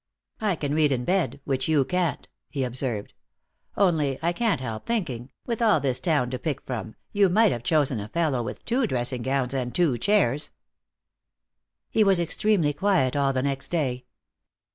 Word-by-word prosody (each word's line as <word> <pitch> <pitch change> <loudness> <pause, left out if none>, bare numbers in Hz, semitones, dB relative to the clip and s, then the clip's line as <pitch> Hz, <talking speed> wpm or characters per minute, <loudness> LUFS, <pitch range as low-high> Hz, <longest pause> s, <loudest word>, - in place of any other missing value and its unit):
"I 210 -4 +1
can 145 -2 -2
read 150 -2 +3
in 125 -2 -1
bed, 170 -8 0
which 130 -2 -1
you 150 -4 +3
can't," 180 +1 -1 0.2
he 135 - -2
observed. 125 -4 -3 0.6
"Only, 155 -9 +2
I 170 +1 +2
can't 225 - +1
help 115 -4 -6
thinking, 135 - -2 0.2
with 235 -1 -3
all 215 -8 +4
this 130 -3 0
town 145 -8 +1
to 130 - -3
pick 155 -4 -2
from, 110 -3 -5 0.2
you 200 -2 +4
might 215 +3 +4
have 120 - -3
chosen 140 -3 +1
a 100 - -5
fellow 155 -3 0
with 115 - -6
two 245 0 +1
dressing 125 - -1
gowns 130 0 0
and 125 -2 -3
two 155 -9 +2
chairs." 150 - +2 1.4
He 220 - +4
was 195 -3 +4
extremely 170 -2 +1
quiet 160 -6 +1
all 140 -1 +2
the 130 -1 -1
next 140 -1 -2
day. 130 -7 -2
145 Hz, 175 wpm, -25 LUFS, 130-180 Hz, 1.4 s, all